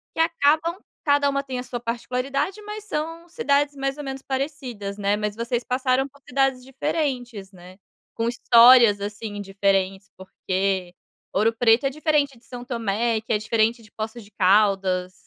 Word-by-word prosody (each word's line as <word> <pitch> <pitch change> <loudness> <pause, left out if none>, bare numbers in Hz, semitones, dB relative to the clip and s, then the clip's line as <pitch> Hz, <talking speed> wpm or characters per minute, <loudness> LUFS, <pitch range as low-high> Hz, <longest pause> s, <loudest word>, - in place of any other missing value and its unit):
que 325 - +1
acabam 330 +2 +2 0.3
cada 285 -1 +3
uma 275 0 -1
tem 260 -2 -5
a - - -4
sua 245 -1 -5
particularidade, 260 - -3
mas 420 0 -7
são 330 +1 -4
cidades 290 -9 +1
mais 275 0 -2
ou 295 - -6
menos 270 -1 -6
parecidas, 260 -8 -4
né. 205 0 +1
Mas 210 -1 -3
vocês 235 +1 -2
passaram 255 +1 0
por 280 +1 -23
cidades 270 -1 +1
diferentes, 250 -7 -3
né. 185 0 -14 0.4
Com 230 0 -1
histórias 235 -3 +6
assim 205 0 -5
diferentes, 195 0 0
porque 190 -1 -2 0.4
Ouro 220 +3 +2
Preto 230 +2 +4
é - - +3
diferente 290 -2 0
de 230 - -24
São 245 -1 -8
Tomé, 230 -1 -1
que 220 - -3
é 210 - +3
diferente 225 +2 0
de 215 - -19
Poços 220 +1 -6
de 205 - -19
Caldas. 190 -2 +2
240 Hz, 165 wpm, -23 LUFS, 205-275 Hz, 0.4 s, histórias